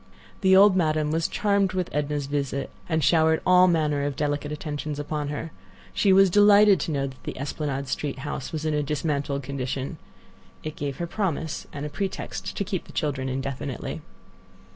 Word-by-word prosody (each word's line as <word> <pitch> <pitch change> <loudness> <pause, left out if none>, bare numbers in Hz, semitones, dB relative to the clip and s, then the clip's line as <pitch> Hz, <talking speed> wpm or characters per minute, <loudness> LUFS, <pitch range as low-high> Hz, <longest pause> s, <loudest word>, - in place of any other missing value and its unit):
The 190 -1 +5
old 195 0 +7
Madame 155 -4 +1
was 165 +1 +1
charmed 200 -2 +1
with 185 -1 -1
Edna's 145 0 -1
visit, 140 -1 -2 0.2
and 160 -2 +1
showered 160 +1 +4
all 180 0 +6
manner 155 -4 +1
of 145 -1 -2
delicate 145 +1 -2
attentions 150 -1 -4
upon 145 0 -3
her. 150 +2 -4 0.4
She 200 - +3
was 190 -1 +6
delighted 205 -1 +6
to 160 - -2
know 140 -2 0
that 135 -1 -9
the - - -6
Esplanade 140 0 -3
Street 145 +2 -3
house 145 -2 -4
was 155 -1 -4
in 155 - +1
a 150 - +1
dismantled 145 -1 -2
condition. 135 0 -4 0.6
It 155 -1 -5
gave 140 -2 -4
her 170 - -2
the 170 - -13
promise 165 -6 -2
and 145 0 -6
pretext 195 -2 -4
to - - 0
keep 190 -2 -3
the - - -14
children 135 -3 -1
indefinitely. 135 0 -4
150 Hz, 180 wpm, -25 LUFS, 140-175 Hz, 0.6 s, old